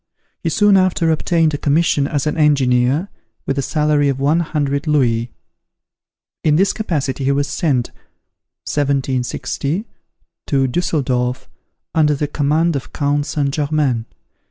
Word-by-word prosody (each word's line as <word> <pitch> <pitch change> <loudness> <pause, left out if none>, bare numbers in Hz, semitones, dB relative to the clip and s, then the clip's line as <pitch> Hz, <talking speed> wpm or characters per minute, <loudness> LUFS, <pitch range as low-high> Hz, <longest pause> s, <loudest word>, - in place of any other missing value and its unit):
He 165 - -1
soon 205 +3 +4
after 185 -3 +2
obtained 160 0 +1
a 145 - -2
commission 145 -1 +2
as 145 -1 -2
an 150 - -1
engineer, 140 +2 +2 0.4
with 135 0 -1
a - - +2
salary 150 0 +1
of 135 -1 -2
one 145 +5 +2
hundred 145 -2 -1
louis. 120 -6 +1 1.1
In 155 -2 +3
this 190 +5 +3
capacity 145 -10 -2
he 140 - +3
was 140 +1 0
sent 135 -7 0 0.8
(1760) 140 - -1 0.6
to 135 -2 +2
Dusseldorf, 130 -4 -1 0.5
under 150 -2 +3
the 145 +1 -2
command 155 +3 +1
of 135 - -5
Count 145 0 0
St. 140 -2 -1
Germain. 145 -6 0
145 Hz, 130 wpm, -18 LUFS, 135-155 Hz, 1.1 s, soon